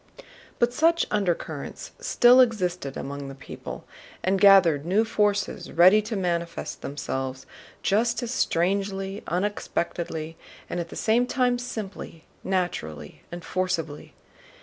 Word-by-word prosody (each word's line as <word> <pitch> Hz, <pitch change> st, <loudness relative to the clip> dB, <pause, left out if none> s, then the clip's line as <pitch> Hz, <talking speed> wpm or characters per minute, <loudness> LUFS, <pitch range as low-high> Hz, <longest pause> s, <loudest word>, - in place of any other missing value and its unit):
But 240 Hz, 0 st, +2 dB
such 335 Hz, +5 st, +3 dB
undercurrents 195 Hz, -5 st, -2 dB
still 245 Hz, +1 st, +5 dB
existed 180 Hz, -, 0 dB
among 140 Hz, 0 st, -5 dB
the 135 Hz, -, -8 dB
people 135 Hz, -, -9 dB, 0.4 s
and 190 Hz, +1 st, +1 dB
gathered 190 Hz, -8 st, +6 dB
new 195 Hz, +7 st, +2 dB
forces 205 Hz, -2 st, 0 dB
ready 185 Hz, +5 st, +6 dB
to 215 Hz, +1 st, -5 dB
manifest 170 Hz, -3 st, -3 dB
themselves 130 Hz, -2 st, -4 dB, 0.4 s
just 230 Hz, +4 st, +1 dB
as 240 Hz, -, -3 dB
strangely, 195 Hz, -1 st, 0 dB
unexpectedly, 170 Hz, -3 st, -3 dB, 0.3 s
and 175 Hz, -, -3 dB
at 170 Hz, -1 st, -4 dB
the -, -, -9 dB
same 235 Hz, +3 st, +2 dB
time 250 Hz, -2 st, +1 dB
simply, 205 Hz, -8 st, -7 dB, 0.2 s
naturally, 80 Hz, -, -3 dB
and 175 Hz, 0 st, -7 dB
forcibly. 175 Hz, -5 st, -3 dB
190 Hz, 120 wpm, -25 LUFS, 165-215 Hz, 0.4 s, gathered